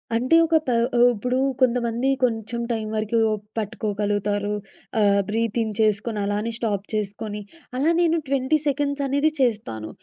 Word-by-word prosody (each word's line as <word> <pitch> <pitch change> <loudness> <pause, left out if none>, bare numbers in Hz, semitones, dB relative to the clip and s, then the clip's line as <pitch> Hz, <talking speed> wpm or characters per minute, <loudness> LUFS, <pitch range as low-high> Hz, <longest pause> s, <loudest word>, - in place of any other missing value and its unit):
అంటే 255 +7 +3
ఒక 325 0 +1
ప - - 0 0.3
ఆహ్, 240 +1 +7
ఇప్పుడు 250 +3 -1 0.2
కొంతమంది 240 0 +2
కొంచెం 230 -1 -1
టైం 220 -2 -2
వరకు 215 +2 0 0.4
పట్టుకోగలుగుతారు 205 -1 -1 0.5
ఆహ్, 200 -1 +4
బ్రీతింగ్ 225 0 -1
చేసుకొని, 215 +1 +1
అలానే 205 +3 -1
స్టాప్ 205 -4 -2
చేసుకొని. 210 0 -3 0.4
అలా 285 +5 +2
నేను 335 -1 +3
20 270 +2 +2
సెకండ్స్ 285 0 0
అనేది 285 +3 +2
చేస్తాను. 205 - -1
225 Hz, 130 wpm, -23 LUFS, 210-255 Hz, 0.5 s, ఆహ్